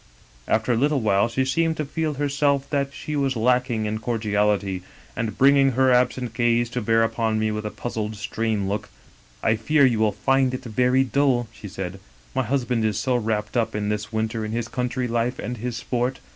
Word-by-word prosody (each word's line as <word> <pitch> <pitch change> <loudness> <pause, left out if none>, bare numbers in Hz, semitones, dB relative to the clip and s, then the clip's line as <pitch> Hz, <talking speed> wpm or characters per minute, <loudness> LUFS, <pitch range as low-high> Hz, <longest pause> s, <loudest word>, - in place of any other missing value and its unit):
" - - -29
After 110 +3 -3
a - - +1
little 145 +3 +2
while 100 0 +3
she 130 +3 0
seemed 160 +4 +1
to 150 - -2
feel 155 +1 -2
herself 140 0 +1
that 140 -1 0
she 150 +2 -5
was 135 -2 0
lacking 120 -1 +1
in 110 +1 -2
cordiality, 105 -4 0 0.3
and, 115 -2 -3
bringing 135 0 +5
her 130 +1 +3
absent 125 -1 +1
gaze 120 0 +1
to 125 - -2
bear 115 +1 +3
upon 115 -1 0
me 110 0 0
with 105 0 -3
a - - -3
puzzled 110 -1 -4
strained 105 0 -2
look: 100 +2 -3 0.5
*I 110 - +3
fear 140 +7 +3
you 120 -4 +2
will 110 -1 +3
find 135 +1 +1
it - - -7
very 125 +3 +2
dull,' 125 -2 +1
she 105 - -9
said, 95 0 -6 0.2
* - - -29
my - - +2
husband 125 -2 0
is 105 -2 0
so 125 +3 0
wrapped 105 -2 -1
up 115 -2 +1
this 105 +1 -2
winter 110 0 -2
in 110 0 -4
his 115 0 -2
country 125 +1 -2
life 120 +2 -1
and 125 +3 -4
his 120 +1 -4
sport. 125 +2 -2
120 Hz, 205 wpm, -24 LUFS, 110-130 Hz, 0.5 s, bringing